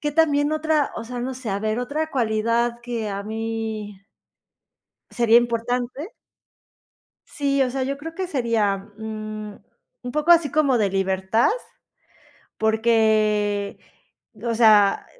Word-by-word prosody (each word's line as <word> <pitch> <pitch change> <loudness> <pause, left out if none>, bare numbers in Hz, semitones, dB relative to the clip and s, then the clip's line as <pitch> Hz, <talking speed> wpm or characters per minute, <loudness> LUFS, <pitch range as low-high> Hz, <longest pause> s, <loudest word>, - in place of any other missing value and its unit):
que 295 -1 -2
también 295 -2 +2
otra, 310 -2 +1
o - - -5
sea, 245 +1 -6
no 260 +2 -3
sé, 250 -3 -7
a 195 0 -1
ver, 215 +2 -1
otra 300 +6 -2
cualidad 235 0 0
que 235 -3 -3
a 200 0 -4
mí 220 -2 -4 1.1
sería 235 -1 +4
importante, 245 - -1 1.2
sí, 280 -3 -1
o 255 - -1
sea, 265 +1 -2
yo 275 +1 -3
creo 325 +3 -8
que 375 0 -3
sería, 230 - 0 0.2
mm, 215 -1 -6 0.5
un 245 - -5
poco 305 +3 +3
así 330 -4 +5
como 285 -5 +3
de 210 -3 +2
libertad, 190 +3 +1 1.1
porque, 215 -2 +1 0.7
o 235 - 0
sea, 215 -3 +5
230 Hz, 130 wpm, -23 LUFS, 215-275 Hz, 1.2 s, así